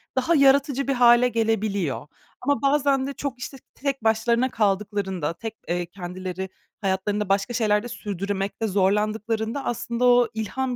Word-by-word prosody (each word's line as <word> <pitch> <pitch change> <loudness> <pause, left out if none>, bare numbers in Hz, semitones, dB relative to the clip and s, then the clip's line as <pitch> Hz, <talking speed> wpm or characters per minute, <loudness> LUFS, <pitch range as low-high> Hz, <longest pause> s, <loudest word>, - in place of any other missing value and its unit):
daha 265 +6 +2
yaratıcı 275 -1 +4
bir 275 - +2
hâle 240 0 +6
gelebiliyor. 215 - -1 0.3
Ama 285 +2 +1
bazen 275 -1 +2
de 280 - -4
çok, 270 -3 -5
işte, 270 +2 -7 0.2
tek 275 -3 -3
başlarına 235 +3 +2
kaldıklarında, 195 -6 -1
tek, 225 +5 -7
eee, 175 +1 -1
kendileri 185 +1 -6 0.3
hayatlarında 200 +1 -1
başka 200 +4 +1
şeyler 215 -3 +2
de 240 - -5
sürdürmekte 200 -1 -3
zorlandıklarında 215 +5 0
aslında 235 +1 -1
o 245 0 +5
ilham 245 +4 -2
220 Hz, 140 wpm, -24 LUFS, 195-255 Hz, 0.3 s, hâle